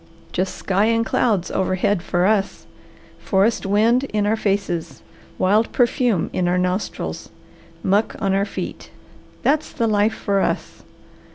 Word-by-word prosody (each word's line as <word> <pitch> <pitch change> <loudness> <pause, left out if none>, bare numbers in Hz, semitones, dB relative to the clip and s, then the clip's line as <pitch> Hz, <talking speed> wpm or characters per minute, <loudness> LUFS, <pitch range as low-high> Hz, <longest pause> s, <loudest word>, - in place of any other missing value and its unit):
Just 185 +1 -2
sky 195 +2 +1
and 230 0 +2
clouds 210 -8 +1
overhead 185 0 0
for 175 0 0
us, 200 -1 0 0.5
forest 200 +1 +1
wind 225 +6 +3
in 210 -5 -1
our 215 +2 +2
faces, 195 -6 -2 0.3
wild 210 +4 +2
perfume 240 -6 +1
in 180 - 0
our 180 +1 +2
nostrils, 180 +2 -3 0.5
muck 205 +3 +1
on 195 -3 0
our 195 - +2
feet, 200 - -6 0.5
that's 300 +2 +1
the 235 - -1
life 215 0 +2
for 200 -1 0
us. - - -2
205 Hz, 140 wpm, -21 LUFS, 190-225 Hz, 0.5 s, wind